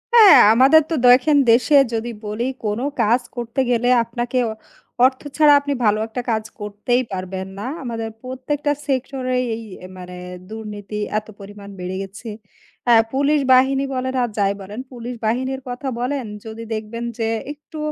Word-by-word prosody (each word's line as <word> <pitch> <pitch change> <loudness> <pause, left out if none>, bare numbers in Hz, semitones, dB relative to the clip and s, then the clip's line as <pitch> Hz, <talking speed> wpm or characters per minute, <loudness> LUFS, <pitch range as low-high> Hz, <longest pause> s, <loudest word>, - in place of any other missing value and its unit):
হ্যাঁ, 435 -4 +9
আমাদের 270 +6 +6
তো - - -1
দেখেন 255 +5 +6
দেশে 240 +5 +4 0.2
যদি 225 +1 -2 0.2
বলি 210 +3 -3 0.2
কোনো 210 +4 -1 0.2
কাজ 230 +3 +3
করতে 240 +1 -4
গেলে 245 0 +1 0.2
আপনাকে 240 +2 -3 0.7
অর্থ 260 0 +1 0.2
ছাড়া 300 -2 +7
আপনি 285 0 -3
ভালো 210 0 +3
একটা 230 +3 -4
কাজ 220 -1 0 0.2
করতেই 210 +5 -1
পারবেন 190 0 -5
না। - - -5 0.2
আমাদের 225 -2 -4
প্রত্যেকটা 265 +3 -2 0.2
সেক্টরেই 255 -1 -1
এই 225 - -8 0.2
অ্যা 185 - -10
মানে 180 0 -9 0.4
দুর্নীতি 210 -1 -7 0.2
এত 215 - -19
পরিমাণ 200 0 -11
বেড়ে 180 +1 -4
গেছে। 200 +4 -9 0.6
আ - - +8 0.2
পুলিশ 285 +2 +2
বাহিনী 265 +1 +4
বলেন 260 0 -2
আর 240 - -1
যাই 200 -1 +2
বলেন, 205 +4 -8
পুলিশ 245 0 -7
বাহিনীর 260 +4 -1
কথা 245 +3 -5
বলেন 255 +1 -2 0.2
যদি 220 +1 -7
দেখবেন 220 +2 -5 0.2
যে 225 - 0 0.2
একটু 300 +1 -12
240 Hz, 155 wpm, -20 LUFS, 215-260 Hz, 0.7 s, হ্যাঁ